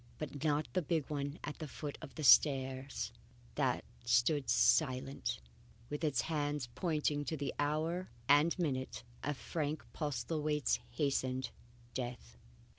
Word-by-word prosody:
But 145 -1 -5
not 150 0 +2
the 185 - +2
big 160 -2 0
one 145 +1 -2
at 145 - -5
the 155 - -4
foot 145 0 -5
of - - -9
the 155 - -4
stairs. 130 -3 +4 0.4
That 130 -4 +1 0.2
still 120 +5 +4
stood 140 - -6
silent, 125 +5 +3 0.5
with 150 +2 -3
its 150 -4 +2
hands 145 -4 -1
pointing 150 0 0
to 160 - -2
the 140 -1 -2
hour 160 +5 0 0.2
and 145 +5 +5
minute 130 - -2 0.2
of 145 -2 -1
Frank 150 -4 -2
Postlethwaite's 150 +1 0
hastened 130 -4 0 0.4
death. 120 - -5
145 Hz, 135 wpm, -35 LUFS, 130-155 Hz, 0.5 s, and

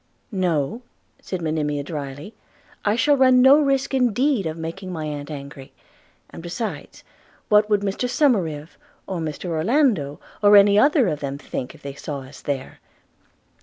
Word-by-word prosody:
'No,' 185 - -1 0.4
said 185 -3 -5
Monimia 150 -2 -1
drily, 145 +5 -7 0.5
'I 205 +1 +2
shall 290 +5 +3
run 255 -2 +5
no 265 +3 +7
such 295 - +1
risk 270 0 0
indeed 250 - +1
of 160 +1 -5
making 170 +4 -6
my 160 -3 -4
aunt 145 -1 -5
angry; 140 -2 -9 0.6
and - - -9
besides, 175 +6 -6 0.5
what 210 0 +4
would 205 -1 +2
Mr 205 +5 -2
Somerive, 180 - 0 0.3
or 185 -3 -4
Mr 155 +1 -5
Orlando, 170 - +1 0.2
or 205 0 +7
any 200 0 +6
other 280 - +4
of 150 -4 -2
them 140 -1 -4
think 130 -3 -6
if - - -19
they 140 0 -6
saw 145 0 -6
us 130 +1 -13
there?' 135 -2 -4
180 Hz, 160 wpm, -22 LUFS, 150-230 Hz, 0.6 s, no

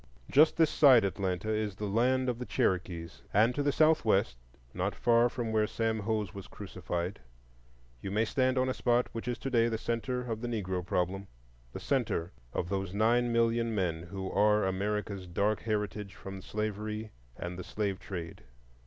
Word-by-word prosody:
Just 155 +3 +5
this 160 -2 +4
side 130 -7 +7
Atlanta 95 0 -2
is 105 -2 -1
the 105 - -4
land 125 +5 +2
of 120 -2 -1
the 125 - -4
Cherokees 90 -7 -1
and 110 +4 +5
to 145 - -1
the 145 0 +2
southwest, 110 - +3 0.4
not - - -2
far 120 0 +4
from 120 -2 -3
where 110 -1 +2
Sam 115 0 -1
Hose 105 -1 -2
was 100 -2 -8
crucified, 90 0 -5 0.8
you - - -4
may 105 +3 +1
stand 130 +2 +1
on 130 0 +2
a 130 - 0
spot 120 -1 +1
which 115 +1 -6
is 120 -2 -1
to 135 - -5
day 115 -2 +4
the 115 -1 -1
centre 115 +2 -2
of 115 -3 -4
the 120 - -3
Negro 95 -6 -2
problem,—the - - -4
centre 85 +2 -1 0.2
of 85 - -2
those 95 0 -2
nine 120 +3 +3
million 115 -1 +2
men 85 -5 0
who 95 +2 -6
are 105 +1 +3
America's 100 0 -2
dark 100 +5 +1
heritage 105 -2 -3
from 95 0 -8
slavery 105 +1 -4 0.3
and 90 +1 -5
the - - -5
slave 100 -1 -2
trade. 85 -4 -7
105 Hz, 175 wpm, -31 LUFS, 95-115 Hz, 0.8 s, side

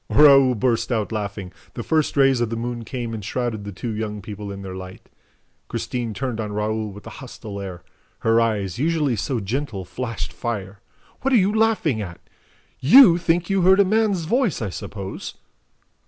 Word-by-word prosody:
Raoul 135 -3 +7
burst 115 +2 0
out 110 -3 -1
laughing. 100 -3 -4 0.2
The 120 - -4
first 155 0 0
rays 135 -3 +4
of 120 - 0
the 115 - -3
moon 120 0 -4
came 120 -1 -5
and 110 -2 -5
shrouded 115 -2 -3
the 100 - -5
two 110 +4 -5
young 105 -1 -4
people 105 -1 -7
in 100 0 -7
their 95 -1 -6
light. 95 0 -10 0.6
Christine 120 -4 -3
turned 125 -3 -3
on 105 -1 -4
Raoul 105 0 -2
with 105 +1 -12
a - - -7
hostile 110 -5 -8
air. 90 -3 -7 0.4
Her 115 +1 +3
eyes, 105 -4 -1
usually 150 -4 +1
so 120 +4 -2
gentle, 110 -2 -3
flashed 115 +4 -5
fire. 100 -4 -4 0.4
"What 270 0 +2
are - - +7
you 200 0 +3
laughing 215 - +2
at? 90 -4 -7 0.6
YOU 175 - +8
think 170 0 +1
you 195 -1 +1
heard 190 +2 +5
a 200 - +6
man's 205 -4 +1
voice, 235 - +1
I 105 -5 -3
suppose?" 95 +1 -7
115 Hz, 185 wpm, -22 LUFS, 105-150 Hz, 0.6 s, YOU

